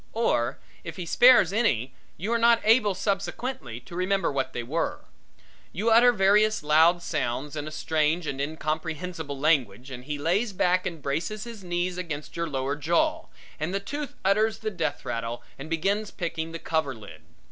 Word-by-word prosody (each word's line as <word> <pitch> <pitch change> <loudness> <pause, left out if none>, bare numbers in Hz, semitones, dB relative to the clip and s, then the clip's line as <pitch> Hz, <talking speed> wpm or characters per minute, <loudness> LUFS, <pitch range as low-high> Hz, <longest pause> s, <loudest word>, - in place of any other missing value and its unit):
Or 170 - +1 0.3
if - - -7
he 180 - -5
spares 240 -1 +6
any 140 - +1 0.2
you 210 +7 -2
are 235 - +2
not 235 0 +5
able 215 -3 +4
subsequently 195 - -3
to 125 +8 -11
remember 190 +1 +1
what 135 -1 -2
they 120 - -4
were. 155 +8 -2 0.7
You 215 +6 0
utter 240 +2 +7
various 210 -1 +3
loud 160 +4 +4
sounds 145 -2 -2
in 150 0 -4
a - - -6
strange 155 +2 0
and 140 -2 -3
incomprehensible 160 +1 -4
language 135 -5 +1
and 125 -1 -8
he 150 0 -3
lays 190 +9 0
back 185 0 +2
and 165 -5 -7
braces 175 +10 -2
his 230 -4 -9
knees 175 0 -2
against 155 -4 -6
your 170 0 -2
lower 135 0 -1
jaw, 160 +3 0 0.3
and 165 +5 -2
the - - +1
tooth 290 +7 -5
utters 215 +3 +3
the 215 -1 -4
death 160 -6 -3
rattle 115 +1 -4 0.2
and 145 +3 -7
begins 200 +6 0
picking 165 -2 -4
the 165 - -5
cover 160 -5 -1
lid. 100 -8 -12
170 Hz, 175 wpm, -26 LUFS, 145-200 Hz, 0.7 s, utter